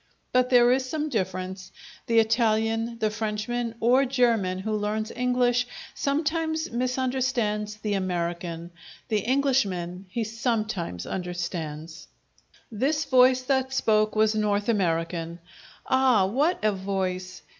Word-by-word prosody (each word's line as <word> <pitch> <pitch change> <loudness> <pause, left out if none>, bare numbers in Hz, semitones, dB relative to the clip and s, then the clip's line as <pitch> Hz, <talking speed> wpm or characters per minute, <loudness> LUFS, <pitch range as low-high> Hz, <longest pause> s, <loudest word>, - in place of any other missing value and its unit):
But 250 0 +3
there 245 -1 +6
is 260 0 +1
some 310 +1 -2
difference: 190 -4 -3 0.4
the 230 - +2
Italian, 225 0 +2
the 215 -2 0
Frenchman, 220 +2 -3
or 250 +4 +4
German 235 -8 +1
who 215 +3 -2
learns 215 +1 -2
English 245 0 +1 0.3
sometimes 315 +2 -1
misunderstands 250 -4 -1
the 210 0 -3
American: 175 -2 -3 0.4
the 215 -2 +2
Englishman 200 -8 0
he 230 +5 -2
sometimes 220 - -2
understands. 170 -3 -5 0.6
This 280 +8 0
voice 255 0 +5
that 265 0 0
spoke 215 -4 +2
was 215 0 +3
North 210 0 0
American. 170 -4 -1 0.5
Ah, 260 -7 +4
what 285 - +1
a 215 - +4
voice! 185 -2 -3
220 Hz, 115 wpm, -26 LUFS, 190-250 Hz, 0.6 s, there